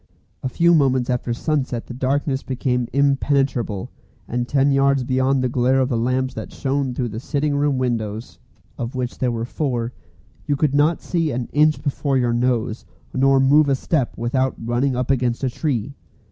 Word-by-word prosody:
A 130 - -2
few 170 +7 +3
moments 130 -5 +2
after 125 -1 -1
sunset 130 -2 -1
the - - -8
darkness 135 +2 -1
became 125 -2 -1
impenetrable, 135 -6 +1 0.4
and 120 0 -2
ten 140 +1 +2
yards 135 -1 +3
beyond 130 +1 +1
the - - +2
glare 125 +2 +2
of 130 0 +1
the 125 - 0
lamps 130 +3 0
that - - -7
shone 135 -2 -2
through 125 -2 -2
the 110 +1 -5
sitting 145 +2 -1
room 145 -1 +1
windows 115 -3 -3 0.4
of 120 +2 -4
which 125 -1 -3
there 125 -2 +1
were 115 0 -3
four 125 -3 -2 0.5
you 145 - +2
could 140 0 +1
not 150 +4 +2
see 165 -3 0
an 125 -3 -3
inch 150 +1 +3
before 140 -1 0
your 120 -2 +1
nose, 120 -2 0 0.3
nor 135 +1 +4
move 145 +2 +5
a 135 - +3
step 135 -1 -1
without 130 +3 0
running 120 +3 0
up 125 +1 0
against 125 -1 0
a 130 - 0
tree. 135 -2 -2
130 Hz, 180 wpm, -21 LUFS, 120-140 Hz, 0.5 s, move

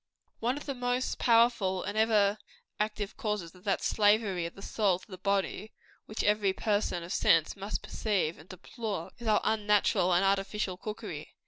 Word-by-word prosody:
One 245 +4 0
of 290 - -8
the 275 - -3
most 245 0 -1
powerful 230 -6 +3
and 205 - -4
ever 215 -2 +3 0.4
active 210 -1 -2
causes 210 -6 -3
of 180 +2 -19
that 195 - 0
slavery 205 -4 +2
of 170 - -12
the 195 - -11
soul 200 -5 +1
to 185 - -17
the 185 - -8
body, 200 +2 -1 0.3
which 215 - -3
every 205 -2 +2
person 205 -5 -1
of 170 - -5
sense 165 -2 +3
must 200 +1 -4
perceive 185 -8 -1
and 160 - -16
deplore, 190 -1 -5
is 235 - -7
our 215 -1 +4
unnatural 210 -3 +2
and 180 +2 +3
artificial 195 0 0
cookery. 210 +4 -7
205 Hz, 175 wpm, -30 LUFS, 185-220 Hz, 0.4 s, our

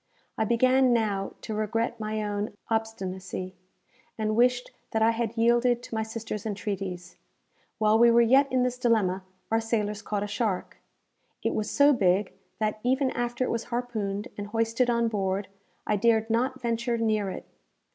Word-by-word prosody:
I 220 - 0
began 255 +3 +4
now 205 -4 0
to 220 - -5
regret 225 +2 -1
my 215 0 -2
own 205 0 -3 0.2
obstinacy, 190 -4 -3 0.6
and 215 -1 0
wished 245 +1 +2 0.2
that 220 0 +1
I 225 - +5
had 230 0 -3
yielded 240 +1 +3
to - - -10
my 220 - 0
sister's 220 -1 -5
entreaties. 195 -4 -4 0.6
While 215 0 +3
we 235 0 +7
were 235 0 +5
yet 270 +4 +4
in 255 -1 +2
this 250 0 -1
dilemma, 215 -7 +2 0.3
our 225 0 +3
sailors 210 -2 -1
caught 205 -2 -2
a - - -3
shark. 205 -2 -2 0.7
It - - 0
was 215 -1 -2
so 285 +1 +5
big, 190 -4 +2 0.2
that, 215 0 -1
even 260 +2 +2
after 240 +1 -2
it - - -1
was 230 0 -2
harpooned 225 -3 -3
and 205 - -4
hoisted 230 +3 +1
on 235 -1 +2
board, 195 -2 -1 0.4
I 210 - +1
dared 225 +1 +2
not 255 +3 0
venture 235 0 -1
near 215 -3 +1
it. 185 - -7
225 Hz, 165 wpm, -27 LUFS, 205-235 Hz, 0.7 s, we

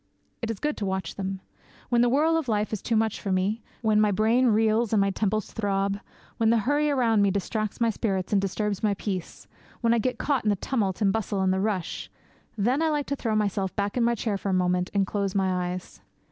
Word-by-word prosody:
It 230 - -3
is 225 - -2
good 300 0 -1
to 205 - -2
watch 190 0 -2
them. 190 -1 -4 0.5
When 240 -1 +3
the 245 - +4
whirl 305 +6 +3
of 325 -4 -1
life 215 -1 0
is 215 - -2
too 230 - -1
much 220 -1 0
for 195 - -2
me; 195 +5 0 0.2
when 215 -1 +4
my 210 - +4
brain 225 +5 +3
reels 220 0 +2
and 215 - +4
my 195 0 +2
temples 215 +1 -1
throb; 200 -2 -1 0.4
when 225 -1 +3
the 230 - +4
hurry 295 +2 +2
around 235 -6 +3
me 200 - +4
distracts 205 +2 -2
my 230 -1 +3
spirit 195 -4 -2
and 200 - +4
disturbs 200 +1 -2
my 210 -2 +1
peace; 190 -3 -5 0.4
when 230 -1 +3
I 235 - +3
get 250 +3 -1
caught 280 -5 0
in 215 - +1
the 205 - +3
tumult 200 -3 -1
and 200 - +4
the - - +1
bustle 205 -3 -1
and 190 0 +2
the 190 - 0
rush 195 -4 -2 0.5
then 245 +8 +1
I 325 - +2
like 295 -2 0
to 280 - -2
throw 225 -5 -1
myself 200 -2 0
back 200 0 -1
in 245 - +2
my 235 0 +2
chair 210 -3 -2
for 200 - -3
a - - +1
moment 180 0 +1
and 200 -1 +2
close 200 -1 -2
my 185 -2 +1
eyes. 180 0 -7
210 Hz, 245 wpm, -26 LUFS, 195-230 Hz, 0.5 s, the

